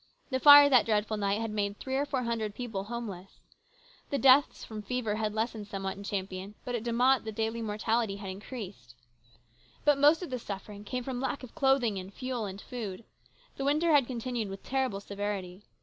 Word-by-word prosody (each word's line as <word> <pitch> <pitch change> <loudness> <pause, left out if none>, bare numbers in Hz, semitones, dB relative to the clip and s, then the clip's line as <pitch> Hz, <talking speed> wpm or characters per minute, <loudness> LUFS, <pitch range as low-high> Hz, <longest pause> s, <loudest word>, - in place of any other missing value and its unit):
The 260 - +1
fire 290 +1 +10
that 255 -5 +5
dreadful 215 0 +1
night 200 0 0
had 225 -1 -3
made 205 -1 -2
three 265 0 -4
or 285 +2 0
four 265 -3 -1
hundred 225 -3 -2
people 225 -6 -4
homeless. 205 -5 -7 0.7
The 280 - 0
deaths 270 +1 +5
from 215 -1 -7
fever 225 -1 -2
had 215 -1 -2
lessened 220 -2 -2
somewhat 195 -1 -4
in 200 - -10
Champion, 195 0 -4
but 245 - -3
at 240 - -1
De 235 +1 -3
Mott 250 +2 +3
the 220 - -4
daily 225 +2 -2
mortality 220 0 0
had 200 -1 -6
increased. 195 - -9 0.9
But 295 -2 +4
most 300 +5 +5
of 340 - -7
the 255 - -2
suffering 205 -1 -7
came 250 +3 -3
from 255 -1 -4
lack 270 0 -2
of 250 - -10
clothing 260 -7 +2
and 185 +1 -9
fuel 255 0 -4
and 195 0 -6
food. 215 -4 -6 0.5
The 275 - -3
winter 305 +4 +2
had 285 -5 +5
continued 240 -3 -3
with 195 0 -8
terrible 260 -7 -1
severity. 200 -2 -4
225 Hz, 195 wpm, -30 LUFS, 200-255 Hz, 0.9 s, fire